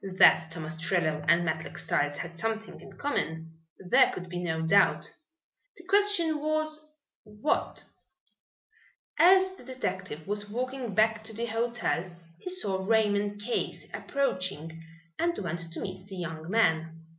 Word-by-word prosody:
That 160 - +7
Tom 165 -1 -4
Ostrello 160 -1 0
and 170 +1 +5
Matlock 160 -1 -3
Styles 145 0 0
had 170 -1 -6
something 220 +5 -3
in - - -12
common 160 - -3 0.2
there 180 -2 +4
could 180 -1 -7
be 175 0 -4
no 160 -2 -1
doubt. 195 +4 +3 0.6
The 345 - -13
question 370 -5 +2
was, 310 0 -1 0.4
What? 210 +6 -1 1.4
As 375 +3 +7
the 375 - -13
detective 190 - -4
was 205 0 -3
walking 250 -1 -3
back 220 0 +3
to 220 - -8
the 230 +2 -2
hotel 230 -6 -1 0.3
he 290 - -5
saw 200 - -1
Raymond 205 -1 +2
Case 235 +3 -3
approaching 185 - -2 0.4
and 340 0 +1
went 170 -2 -3
to - - -4
meet 185 0 -6
the 195 - -8
young 165 -2 -5
man. 165 -6 +1
200 Hz, 140 wpm, -29 LUFS, 165-245 Hz, 1.4 s, That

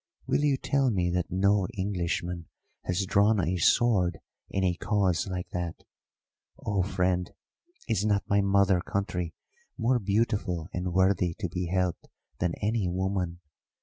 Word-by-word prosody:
Will - - +1
you 145 -2 +3
tell 135 0 +1
me 90 -5 +1
that 90 0 -1
no 100 +1 +2
Englishman 90 -3 -2 0.4
has 90 +2 0
drawn 100 +3 +3
a 90 +1 0
sword 90 -1 +3 0.3
in 95 - -1
a 90 -1 +3
cause 95 -1 +1
like 90 -2 -4
that? 85 -2 -4 0.7
Oh, 100 -2 -1
friend, 90 -1 0 0.6
is 110 -5 +1
not 105 -2 +1
my 100 0 +3
mother 100 -2 +3
country 90 -3 -3 0.4
more 125 +1 +2
beautiful 100 -5 0
and 90 0 -2
worthy 95 -2 +2
to 105 - -3
be 90 0 -3
helped 90 -1 -1 0.3
than 90 -1 0
any 105 -2 +1
woman? 90 -1 -2
95 Hz, 145 wpm, -28 LUFS, 90-100 Hz, 0.7 s, you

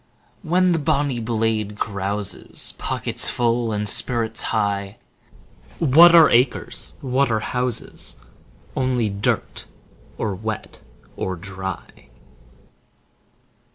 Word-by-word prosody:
20 170 - -12
When 180 0 +4
the 165 - +1
bonny 140 -3 0
blade 110 -2 -1
carouses, 100 -1 -3
Pockets - - 0
full, 120 -1 0
and 105 0 -1
spirits 115 +1 +1
high— 100 -1 -1 0.8
What 165 +3 +7
are 165 -2 +9
acres? 125 +2 +1
What 135 +1 +1
are 110 - +1
houses? 125 +2 -2 0.6
Only 125 -4 0
dirt, 100 +1 -2 0.5
or 105 -3 -2
wet 110 +2 -6 0.3
or 95 - -3
dry. 95 -3 -8
115 Hz, 100 wpm, -22 LUFS, 105-130 Hz, 0.8 s, are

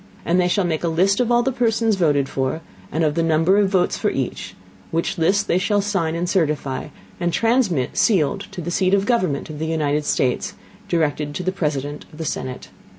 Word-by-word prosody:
And 180 +2 +3
they 180 - +2
shall 195 +2 +1
make 160 -2 -1
a - - +1
List 185 +5 +2
of 245 -1 +1
all 240 0 +4
the 265 - +1
Persons 225 -3 +1
voted 145 -7 +2
for, 135 +5 -2 0.3
and 160 +2 0
of 150 -2 +2
the 165 - 0
Number 165 +4 +3
of 200 -2 +3
Votes 190 -2 +1
for - - +1
each; - - -4 0.3
which 170 +3 -1
List 200 +5 +2
they 175 - +2
shall 205 +2 +1
sign 190 -6 -1
and 175 +1 -1
certify, 150 -8 -1 0.3
and 175 -1 0
transmit 220 - +1
sealed 195 - +2
to 180 - -7
the 175 +1 -4
Seat 185 +2 +2
of 200 - +2
the - - -5
Government 185 - 0
of 150 - -8
the 160 - -2
United 150 -2 0
States, 130 -3 0 0.3
directed 150 -3 0
to 180 - -3
the 185 - 0
President 150 -5 -3
of 150 - -14
the 160 - -4
Senate. 130 -3 -4
170 Hz, 215 wpm, -21 LUFS, 150-195 Hz, 0.3 s, all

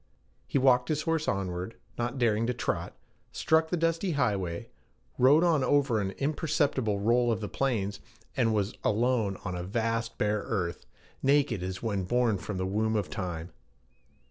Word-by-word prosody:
He - - 0
walked 125 -2 +4
his 150 -1 0
horse 165 -1 0
onward, 95 +1 -2 0.2
not 120 +3 -2
daring 115 -2 +2
to 125 - -1
trot, - - -3 0.3
struck 160 0 +2
the 175 - 0
dusty 165 +2 0
highway, 100 - -1 0.5
rode 140 +6 +6
on 160 -6 +3
over 135 -4 +2
an 95 - -1
imperceptible 140 -7 0
roll 120 +3 +3
of 110 - 0
the 105 - -4
plains, 105 -6 -1 0.4
and 115 -3 +2
was 105 -1 0
alone 110 -2 +1
on 90 - -2
a 90 - -3
vast 115 +4 -2
bare 105 0 +1
earth, 90 -6 -3 0.3
naked 135 -7 +2
as 95 +2 -5
when 100 -5 -1
born 120 -1 +1
from 95 +3 -5
the 95 - -1
womb 110 +3 0
of 105 -3 -1
time. 90 -5 -4
115 Hz, 165 wpm, -29 LUFS, 100-135 Hz, 0.5 s, rode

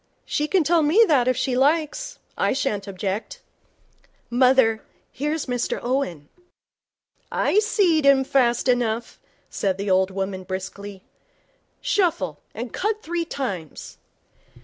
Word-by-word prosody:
'She 300 - -1
can 370 0 +2
tell 335 +2 +3
me 340 +10 +5
that 265 -6 +3
if 255 -1 +2
she 255 - 0
likes. 320 - 0 0.2
I - - +1
shan't 215 -7 -2
object.' 195 - -4 0.9
'Mother, 250 -3 +4 0.3
here's 300 +3 -2
Mr 245 -2 -2
Owen.' 240 - -2 1.0
'I 415 - +2
seed 390 -8 +2
him 275 -1 +5
fast 250 -2 +2
enough,' 240 -2 0 0.3
said 190 -2 -1
the 200 0 -2
old 190 0 +3
woman, 190 0 -4
briskly. 190 +1 -7 0.8
'Shuffle, 195 - 0 0.2
an' 235 +2 -5
cut 430 +1 -2
three 340 0 -2
times.' 200 - -6
255 Hz, 125 wpm, -23 LUFS, 200-310 Hz, 1.0 s, me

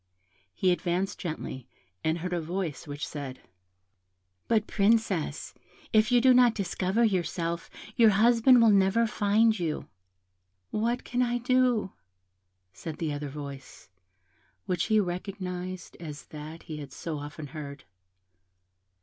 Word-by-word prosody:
He 185 - +2
advanced 180 +2 -1
gently, 155 -7 -5 0.4
and 160 +1 +1
heard 180 +2 -4
a 175 - 0
voice, 170 -2 -4
which 145 0 -4
said, 140 -3 -6 1.1
"But 220 -2 +2
Princess, 200 -8 +1 0.4
if 215 +1 +4
you 245 - +6
do 255 +1 +6
not 245 -2 +5
discover 195 +2 0
yourself, 170 -4 -1 0.3
your 230 -2 +7
husband 235 +4 +5
will 225 - +6
never 200 +3 +4
find 215 0 +2
you." 160 -3 -2 0.8
"What 235 +3 0
can 245 0 -1
I 240 -1 +1
do?" 245 -4 +2 0.8
said 150 - -7
the 160 -3 -2
other 145 0 -4
voice, 140 -9 -9 0.8
which 180 -2 0
he 215 -1 +3
recognised 185 -1 -4
as 150 -4 -8
that 155 +2 -9
he 155 - -7
had 145 -3 -8
so 155 0 -5
often 145 +1 -7
heard. 140 -3 -7
185 Hz, 130 wpm, -28 LUFS, 155-220 Hz, 1.1 s, your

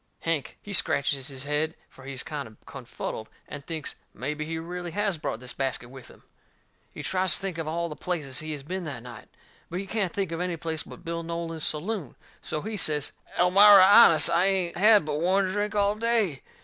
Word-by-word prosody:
Hank, 160 -6 -2
he 205 - -7
scratches 140 -6 +2
his 135 -2 -6
head, 150 +2 -1
for 135 - -16
he's 135 -1 -4
kind 145 -6 -5
o' 110 - -18
confuddled, 120 -4 -6 0.2
and 145 -1 -8
thinks 160 -2 -5 0.2
mebby 150 +6 -3
he 165 +1 -4
really 175 +2 -5
has 200 -1 -1
brought 110 - -3
this 125 0 -7
basket 130 -3 -3
with 130 -2 -11
him. - - -17 0.7
He - - -8
tries 185 -2 +1
to - - -4
think 190 -4 -4
of 160 - -3
all 170 +2 -1
the 150 - -7
places 150 -8 -3
he 155 0 -5
has 145 -2 -7
been 185 +5 -4
that 130 -6 -6
night. 120 -3 -11 0.4
But 175 - -3
he 195 - -4
can't 195 -3 -1
think 195 -4 -2
of 165 +1 -3
any 180 -2 -2
place 160 0 -4
but 175 - -12
Bill 170 0 -3
Nolan's 165 -1 -4
saloon. 165 - -3 0.3
So 150 - -4
he 220 0 -4
says: 150 -5 +1 0.3
"Elmira, 195 +2 +8
honest, 185 -4 +7
I 175 +3 +3
ain't 185 -3 +1
had 210 -1 +6
but 150 -1 -2
one 190 +3 +3
drink 205 +1 -2
all 205 0 +3
day." 215 - 0
165 Hz, 210 wpm, -27 LUFS, 145-190 Hz, 0.7 s, Elmira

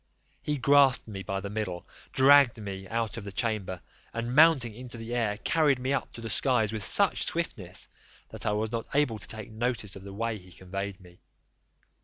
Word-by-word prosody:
He 150 -1 -1
grasped 140 -1 +5
me 100 -3 -6
by 95 +1 -3
the 100 - -5
middle, 100 -5 -4 0.2
dragged 135 -3 +6
me 95 -2 -6
out 115 +2 -2
of 115 - -5
the 100 - -7
chamber, 100 -5 -2 0.3
and 115 +1 -2
mounting 145 -6 +5
into 120 +1 -9
the 115 +1 -6
air, 110 -4 0
carried 150 +2 +2
me 130 +2 -1
up 140 - -2
to 115 - -9
the 115 - -5
skies 120 -5 +2
with 110 - -3
such 200 - +2
swiftness, 105 - -3 0.4
that - - -4
I - - +3
was 110 +1 -1
not 115 -1 -3
able 125 -7 +2
to - - -7
take 110 0 -5
notice 110 -2 -2
of 95 - -9
the 100 +1 -9
way 110 +2 -2
he 90 0 -17
conveyed 95 +2 -6
me. 90 -2 -17
110 Hz, 200 wpm, -28 LUFS, 100-125 Hz, 0.4 s, dragged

